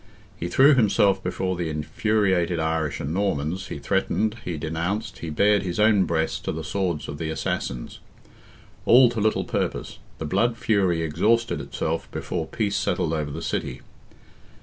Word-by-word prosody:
He 85 -2 -4
threw 135 +11 +6
himself 100 -5 +3
before 95 -1 -2
the 85 -2 -2
infuriated 90 +3 0
Irish 80 -2 -1
and 70 +3 -3
Normans, 95 -2 -1
he - - -5
threatened, 105 +8 0
he 85 -3 -4
denounced, 85 +5 -3
he 85 - -5
bared 100 +6 +3
his 90 0 -4
own 105 -3 +5
breast 80 -1 -1
to - - 0
the 80 - -5
swords 85 -1 -2
of 75 - -6
the 80 - -3
assassins. 65 -5 -3 0.9
All 125 +1 +7
to 115 - -3
little 110 +1 +2
purpose; - - -3 0.2
the - - -5
blood 115 +10 +1
fury 95 -7 +1
exhausted 110 +9 +1
itself 80 +1 -3
before 80 -3 -4
peace 100 +4 -1
settled 85 -4 0
over 75 -2 -2
the 70 - -6
city. - - -3
90 Hz, 160 wpm, -24 LUFS, 80-105 Hz, 0.9 s, All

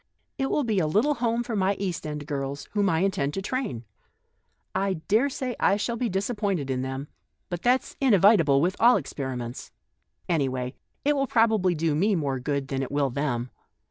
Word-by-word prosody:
It 270 - 0
will 295 - +1
be 220 -5 +1
a 160 - +1
little 220 - +2
home 235 -2 0
for 235 -2 -4
my 195 0 +2
East 185 -6 -3
End 150 -1 -5
girls, 140 -1 -4
whom 205 -2 +2
I 165 -2 +1
intend 150 -7 0
to 195 - -2
train. 220 - -3 0.9
I 195 0 +1
daresay 250 - 0
I 200 - +3
shall 230 +3 -2
be 235 0 -1
disappointed 195 - -1
in 130 -1 -1
them, 135 +2 -4 0.4
but 175 -2 -4
that's 250 +2 +1
inevitable 195 - +5
with 180 +4 +1
all 240 0 +6
experiments. 130 -6 -5 0.6
Any 150 -6 +1
way, 125 0 -4 0.3
it 295 +1 +3
will 275 -1 0
probably 220 -7 +3
do 160 0 0
me 195 +7 +2
more 140 -5 -1
good 140 +1 -2
than 135 -1 -1
it 135 - -4
will 140 -2 +1
them. 125 -3 -2
180 Hz, 185 wpm, -26 LUFS, 140-220 Hz, 0.9 s, all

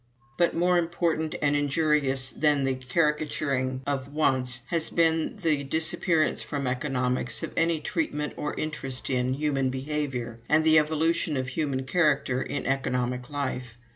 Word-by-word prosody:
"But 175 +3 +2
more 175 +1 +3
important 165 -2 -1
and 145 0 +3
injurious 145 -3 +1
than 145 -2 +2
the 135 0 +1
caricaturing 135 -1 -1
of 140 -1 -2
wants 130 -4 +1
has 165 -2 0
been 165 +2 +1
the 155 -6 +1
disappearance 160 +2 +1
from 140 -2 -3
Economics 125 -1 -1
of - - -4
any 165 -1 +2
treatment 150 -2 -2
or 150 - -3
interest 135 -4 -3
in 125 0 +1
human 135 -2 0
behavior 130 -3 -3
and 155 +1 +4
the 160 0 +6
evolution 160 0 0
of 130 0 -2
human 135 -2 -1
character 135 -3 +1
in 145 - -3
Economic 125 -2 -1
life. 130 -5 -4
145 Hz, 140 wpm, -27 LUFS, 130-155 Hz, -, the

